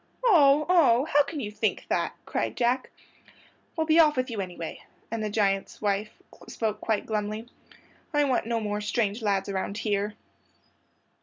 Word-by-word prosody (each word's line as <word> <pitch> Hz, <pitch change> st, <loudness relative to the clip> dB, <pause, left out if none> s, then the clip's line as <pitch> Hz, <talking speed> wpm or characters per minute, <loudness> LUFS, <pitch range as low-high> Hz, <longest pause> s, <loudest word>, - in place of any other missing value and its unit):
"Oh, 300 Hz, -, +6 dB
oh! 280 Hz, -8 st, +4 dB
How 290 Hz, -2 st, +4 dB
can 290 Hz, 0 st, -5 dB
you 210 Hz, -4 st, -4 dB
think 210 Hz, -, -1 dB
that?" -, -, 0 dB
cried -, -, -2 dB
Jack. 250 Hz, +1 st, +1 dB, 0.9 s
"Well, 320 Hz, -2 st, 0 dB
be 320 Hz, +1 st, +4 dB
off 300 Hz, -3 st, +5 dB
with 255 Hz, -1 st, -1 dB
you, 215 Hz, -3 st, -2 dB
anyway"; 175 Hz, -3 st, -7 dB, 0.3 s
and 225 Hz, -1 st, -2 dB
the 215 Hz, -, -1 dB
giant's 200 Hz, -2 st, 0 dB
wife 205 Hz, 0 st, 0 dB, 0.4 s
spoke 220 Hz, -2 st, -3 dB
quite 220 Hz, -2 st, -1 dB
glumly. 215 Hz, +1 st, -3 dB, 0.6 s
"I 295 Hz, -2 st, +3 dB
want 260 Hz, -5 st, 0 dB
no 230 Hz, -1 st, 0 dB
more 210 Hz, -1 st, -2 dB
strange 210 Hz, +1 st, -1 dB
lads 200 Hz, -3 st, 0 dB
around 195 Hz, +1 st, -3 dB
here." 205 Hz, -1 st, -1 dB
225 Hz, 160 wpm, -27 LUFS, 205-275 Hz, 0.9 s, Oh